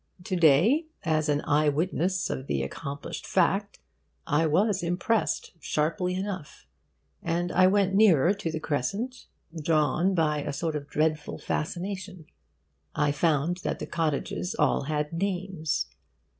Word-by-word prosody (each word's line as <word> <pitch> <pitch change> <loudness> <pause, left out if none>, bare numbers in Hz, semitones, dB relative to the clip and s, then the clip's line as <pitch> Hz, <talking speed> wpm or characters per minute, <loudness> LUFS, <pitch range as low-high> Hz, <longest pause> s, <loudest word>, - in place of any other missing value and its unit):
To 185 - -2
day, 180 - +4 0.2
as 155 -2 +1
an 145 0 +2
eye 150 +1 +3
witness 180 +4 0
of 130 - -5
the 70 -1 0
accomplished 140 - -6
fact, 200 +2 +1 0.5
I 160 +1 +2
was 195 +5 +2
impressed, 175 +6 0
sharply 170 +4 0
enough, 190 -5 -5 0.6
and 175 +1 -1
I 185 0 +5
went 195 0 +2
nearer 195 -4 +5
to 200 -5 -4
the 160 - -3
crescent, 200 - -3 0.4
drawn 165 +4 +2
by 150 -3 +1
a 145 - -4
sort 160 +2 -2
of 145 -1 -4
dreadful 155 0 0
fascination. 185 +1 -4 0.7
I 145 -1 +2
found 155 +3 +1
that - - -3
the - - -5
cottages 165 +4 -2
all - - +2
had 150 +1 -2
names. 175 - -1
165 Hz, 135 wpm, -27 LUFS, 150-190 Hz, 0.7 s, I